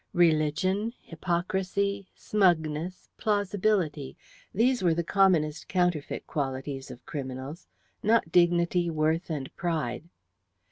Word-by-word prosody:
Religion, 175 Hz, +6 st, +2 dB
hypocrisy, 190 Hz, +3 st, -2 dB
smugness, 175 Hz, -3 st, 0 dB
plausibility; 200 Hz, -, 0 dB, 0.3 s
these 245 Hz, +4 st, +2 dB
were 170 Hz, -3 st, +3 dB
the 170 Hz, -, 0 dB
commonest 170 Hz, -5 st, +2 dB
counterfeit 175 Hz, -5 st, 0 dB
qualities 135 Hz, -2 st, -3 dB
of 125 Hz, -1 st, -11 dB
criminals; 135 Hz, +2 st, -6 dB, 0.3 s
not 220 Hz, -6 st, +2 dB
dignity, 175 Hz, 0 st, +3 dB
worth, 160 Hz, +2 st, 0 dB
and 145 Hz, -4 st, -4 dB
pride. 160 Hz, -3 st, -2 dB
170 Hz, 95 wpm, -28 LUFS, 150-190 Hz, 0.3 s, were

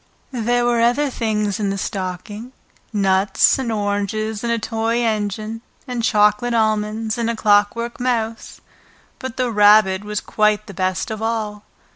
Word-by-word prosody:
There 240 Hz, 0 st, +1 dB
were 240 Hz, -1 st, +2 dB
other 260 Hz, +5 st, +2 dB
things 210 Hz, -4 st, -1 dB
in 205 Hz, -2 st, 0 dB
the 195 Hz, -, -2 dB
stocking, 200 Hz, +5 st, -5 dB, 0.4 s
nuts 195 Hz, +2 st, +3 dB
and 245 Hz, -3 st, -2 dB
oranges 210 Hz, +1 st, -2 dB
and 235 Hz, -, -1 dB
a 235 Hz, -, +1 dB
toy 225 Hz, +1 st, -1 dB
engine, 215 Hz, 0 st, -2 dB, 0.3 s
and 245 Hz, -2 st, -3 dB
chocolate 210 Hz, +1 st, +2 dB
almonds 215 Hz, 0 st, 0 dB
and 230 Hz, -1 st, 0 dB
a 230 Hz, -, -1 dB
clockwork 215 Hz, +3 st, +1 dB
mouse, 230 Hz, -2 st, -2 dB, 0.6 s
but 260 Hz, -3 st, -6 dB
the 250 Hz, -2 st, 0 dB
Rabbit 205 Hz, -2 st, +5 dB
was 210 Hz, 0 st, -3 dB
quite 210 Hz, 0 st, +1 dB
the -, -, -10 dB
best 185 Hz, +2 st, -2 dB
of 220 Hz, 0 st, -5 dB
all. 215 Hz, -2 st, -3 dB
215 Hz, 150 wpm, -20 LUFS, 205-235 Hz, 0.6 s, Rabbit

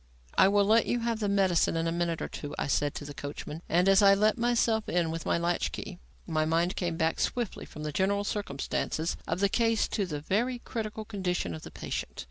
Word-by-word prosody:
"I -, -, +6 dB
will 200 Hz, 0 st, +4 dB
let 220 Hz, +3 st, +4 dB
you 240 Hz, -, 0 dB
have 230 Hz, -1 st, -1 dB
the 205 Hz, -2 st, 0 dB
medicine 190 Hz, -4 st, +2 dB
in 165 Hz, -, 0 dB
a 165 Hz, -, 0 dB
minute 170 Hz, -1 st, -1 dB
or -, -, -2 dB
two," 145 Hz, -, -7 dB
I -, -, -1 dB
said 145 Hz, +1 st, 0 dB
to 145 Hz, -, -6 dB
the 145 Hz, -, -7 dB
coachman; 145 Hz, +2 st, -6 dB
and, 180 Hz, +3 st, +3 dB
as 195 Hz, 0 st, +6 dB
I 200 Hz, -1 st, +7 dB
let 210 Hz, +2 st, +3 dB
myself 230 Hz, -2 st, +1 dB
in 170 Hz, -2 st, +1 dB
with 165 Hz, 0 st, -5 dB
my -, -, +2 dB
latch 170 Hz, -, 0 dB
key, -, -, -7 dB, 0.3 s
my 155 Hz, 0 st, 0 dB
mind 165 Hz, +3 st, +1 dB
came 170 Hz, -3 st, -2 dB
back 160 Hz, 0 st, +1 dB
swiftly 240 Hz, -5 st, -2 dB
from 150 Hz, -, -9 dB
the 150 Hz, -, -2 dB
general 200 Hz, +5 st, +1 dB
circumstances 165 Hz, -4 st, -2 dB
of 165 Hz, +3 st, -2 dB
the 200 Hz, -, +5 dB
case 225 Hz, +2 st, +2 dB
to 200 Hz, -3 st, -1 dB
the 150 Hz, -4 st, -4 dB
very 230 Hz, -, 0 dB
critical 220 Hz, -2 st, -5 dB
condition 185 Hz, -, -2 dB
of 80 Hz, -, -7 dB
the -, -, -9 dB
patient. -, -, -5 dB
185 Hz, 230 wpm, -29 LUFS, 165-210 Hz, 0.3 s, I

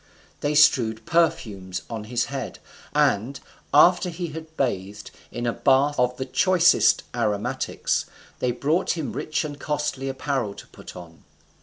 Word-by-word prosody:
They 145 Hz, +1 st, -1 dB
strewed 115 Hz, -7 st, +4 dB
perfumes 105 Hz, -, 0 dB
on 110 Hz, -2 st, -6 dB
his 120 Hz, +2 st, -1 dB
head, -, -, -5 dB, 0.3 s
and, 120 Hz, +7 st, +1 dB, 0.3 s
after 175 Hz, +5 st, +5 dB
he 170 Hz, 0 st, -5 dB
had 160 Hz, +1 st, -10 dB
bathed 100 Hz, -5 st, -3 dB, 0.2 s
in 120 Hz, -, -4 dB
a 120 Hz, -, 0 dB
bath 140 Hz, +1 st, +2 dB
of 125 Hz, 0 st, +1 dB
the 130 Hz, -, -3 dB
choicest 175 Hz, +6 st, +4 dB
aromatics, 105 Hz, -1 st, -1 dB, 0.3 s
they 125 Hz, -, 0 dB
brought 155 Hz, +9 st, 0 dB
him 155 Hz, -, -4 dB
rich 155 Hz, +1 st, -2 dB
and 145 Hz, -1 st, -7 dB
costly 145 Hz, -2 st, -2 dB
apparel 130 Hz, -6 st, -2 dB
to -, -, -11 dB
put -, -, -12 dB
on. 85 Hz, -2 st, -12 dB
135 Hz, 145 wpm, -24 LUFS, 110-155 Hz, 0.3 s, after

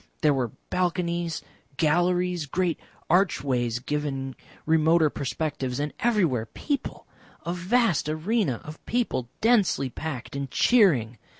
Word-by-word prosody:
There 150 Hz, -1 st, +5 dB
were 125 Hz, -5 st, -1 dB, 0.2 s
balconies, 175 Hz, -2 st, -1 dB, 0.3 s
galleries, 175 Hz, +1 st, +1 dB
great 175 Hz, +3 st, 0 dB, 0.3 s
archways 135 Hz, -, +1 dB
giving 135 Hz, 0 st, -3 dB, 0.3 s
remoter 160 Hz, 0 st, +4 dB
perspectives, 135 Hz, -2 st, -3 dB
and 145 Hz, 0 st, -2 dB
everywhere 180 Hz, -, +1 dB
people, 285 Hz, -, -4 dB, 0.4 s
a 170 Hz, -, -1 dB
vast 180 Hz, -, +1 dB
arena 155 Hz, -, 0 dB
of 155 Hz, +1 st, -10 dB
people, 225 Hz, -, -1 dB
densely 205 Hz, -, +3 dB
packed 140 Hz, -4 st, -6 dB
and 140 Hz, -1 st, -3 dB
cheering. 130 Hz, -, +3 dB
160 Hz, 110 wpm, -26 LUFS, 135-180 Hz, 0.4 s, There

